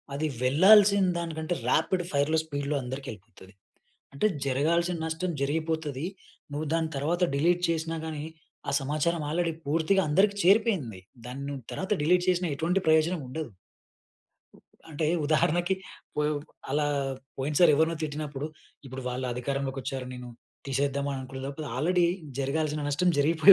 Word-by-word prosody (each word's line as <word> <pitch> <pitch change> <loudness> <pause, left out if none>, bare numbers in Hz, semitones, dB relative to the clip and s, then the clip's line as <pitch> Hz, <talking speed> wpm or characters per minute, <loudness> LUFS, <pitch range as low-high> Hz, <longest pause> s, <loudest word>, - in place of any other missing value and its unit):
అది 155 +2 0 0.2
వెళ్ళాల్సిన 195 +7 +6
దానికంటే, 165 0 -3
రాపిడ్ 180 -2 +2
ఫైర్‌లో, 145 +3 +2
స్పీడ్‌లో 145 -1 -2
అందరికి 130 +2 -6
వెళ్ళిపోతది. 100 -2 -15 0.6
అంటే 140 - +2 0.2
జరగాల్సిన 170 +6 +1
నష్టం 160 +3 -2
జరిగిపోతది. 155 0 -1 0.5
నువ్వు 150 +2 -3
దాని 165 -1 +1
తర్వాత 170 +6 0
డిలీట్ 175 +4 +2
చేసినా 165 0 -1
గాని, 155 -2 -4 0.4
ఆ - - +2
సమాచారం 155 +4 0
ఆల్రెడీ 170 +1 0
పూర్తిగా 165 +6 +2
అందరికి 200 +6 +3
చేరిపోయింది. 185 - +3 0.2
దాన్ని 130 +3 -6
నువ్వు 140 -3 -5
తర్వాత 190 +3 -3
డిలీట్ 180 +3 +3
చేసిన 180 0 +2
ఎటువంటి 175 +6 +1
ప్రయోజనం 160 +2 +3
ఉండదు. 145 +2 -5 1.4
అంటే, 155 0 -1 0.2
ఉదాహరణకి 175 +4 +2 0.4
పోయో 150 0 +1 0.4
అలా 145 +1 +1 0.5
పోయినసారి 150 +5 +4
ఎవరినో 160 +2 +2
తిట్టినప్పుడు, 150 -1 -3 0.4
ఇప్పుడు 130 0 -7
వాళ్ళ 125 +1 -3
అధికారంలోకి 135 +1 -2
వచ్చారు. 130 -1 -4
నేను 125 0 -8 0.4
తీసేద్దాం 140 +1 0
అని 140 - -2
అననుకునేలోపలా 135 +3 -6
ఆల్రెడీ 175 +4 +3 0.3
జరగాల్సిన 150 +2 -1
నష్టం 160 +5 +2
జరిగిపోయి 160 +6 +7
155 Hz, 130 wpm, -28 LUFS, 140-170 Hz, 1.4 s, జరిగిపోయి